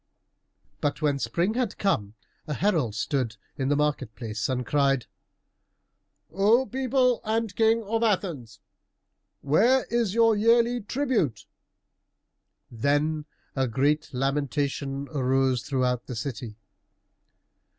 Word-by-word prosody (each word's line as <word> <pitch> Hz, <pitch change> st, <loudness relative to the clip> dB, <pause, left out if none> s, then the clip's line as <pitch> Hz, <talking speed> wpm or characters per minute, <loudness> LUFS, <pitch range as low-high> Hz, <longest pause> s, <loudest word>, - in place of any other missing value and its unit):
But 145 Hz, -, -1 dB
when 145 Hz, -2 st, +1 dB
spring 175 Hz, +9 st, 0 dB
had 240 Hz, -3 st, -2 dB
come, 105 Hz, -, 0 dB, 0.3 s
a 150 Hz, -, -2 dB
herald 160 Hz, -, +1 dB
stood 115 Hz, -2 st, -1 dB, 0.2 s
in 135 Hz, 0 st, -1 dB
the 145 Hz, -, +3 dB
market 150 Hz, -7 st, -1 dB
place 110 Hz, -1 st, -4 dB
and 125 Hz, -1 st, -1 dB
cried, 140 Hz, -3 st, +2 dB, 1.3 s
"O 210 Hz, +9 st, +3 dB
people 255 Hz, -1 st, +1 dB
and 220 Hz, -2 st, -1 dB
King 225 Hz, 0 st, +3 dB
of 225 Hz, +2 st, -1 dB
Athens, 170 Hz, -, -1 dB, 0.8 s
where 230 Hz, -, +3 dB
is 230 Hz, -4 st, 0 dB
your 225 Hz, -1 st, +5 dB
yearly 235 Hz, +3 st, +3 dB
tribute?" 230 Hz, -, -1 dB, 1.3 s
Then 145 Hz, +5 st, 0 dB, 0.3 s
a 135 Hz, -1 st, +1 dB
great 140 Hz, +6 st, 0 dB
lamentation 140 Hz, +1 st, -2 dB
arose 130 Hz, -3 st, +1 dB
throughout 125 Hz, -3 st, -1 dB
the 125 Hz, -, -5 dB
city. 115 Hz, -2 st, -5 dB
150 Hz, 110 wpm, -26 LUFS, 130-220 Hz, 1.3 s, your